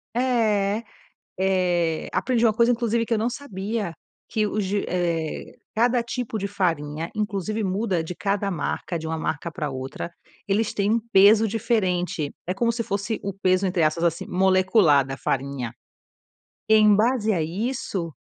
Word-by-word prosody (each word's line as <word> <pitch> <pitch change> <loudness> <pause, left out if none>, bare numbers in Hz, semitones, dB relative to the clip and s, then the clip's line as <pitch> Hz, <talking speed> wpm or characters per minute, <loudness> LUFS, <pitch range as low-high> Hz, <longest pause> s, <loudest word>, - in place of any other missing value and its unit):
é, 220 -4 +1 0.6
eh, 180 -4 +1
aprendi 235 +5 +1
uma 220 - +4
coisa 235 +2 +4
inclusive 230 -1 0
que 235 - +1
eu 220 - +1
não 230 +3 0
sabia, 215 -6 -4 0.4
que 215 -1 +1
os 210 0 -1
de 200 +2 -1
eh, 170 -3 -2 0.2
cada 240 +2 +3
tipo 235 -1 -4
de 200 - -2
farinha, 165 -5 -1
inclusive 210 0 -2
muda 190 -2 0
de 180 - -6
cada 200 +2 -1
marca, 175 0 -3
de 160 - -6
uma 160 0 -2
marca 160 +1 -3
para 150 -2 -4
outra. 130 +5 -5 0.4
Eles 210 +2 0
têm 200 +1 +1
um 230 - +2
peso 210 +3 +6
diferente, 185 - 0 0.2
é 180 - 0
como 230 +4 +1
se 230 0 -2
fosse 200 +1 -2
o 200 - -2
peso, 185 0 +1
entre 180 -2 +1
aspas, 155 +2 +1
assim, 170 -1 0
molecular 185 -5 +4
da 135 - -5
farinha. 135 -3 -2 1.0
Em 215 -1 +6
base 220 0 +2
a 170 - 0
isso, 190 0 -3
195 Hz, 160 wpm, -24 LUFS, 170-220 Hz, 1.0 s, peso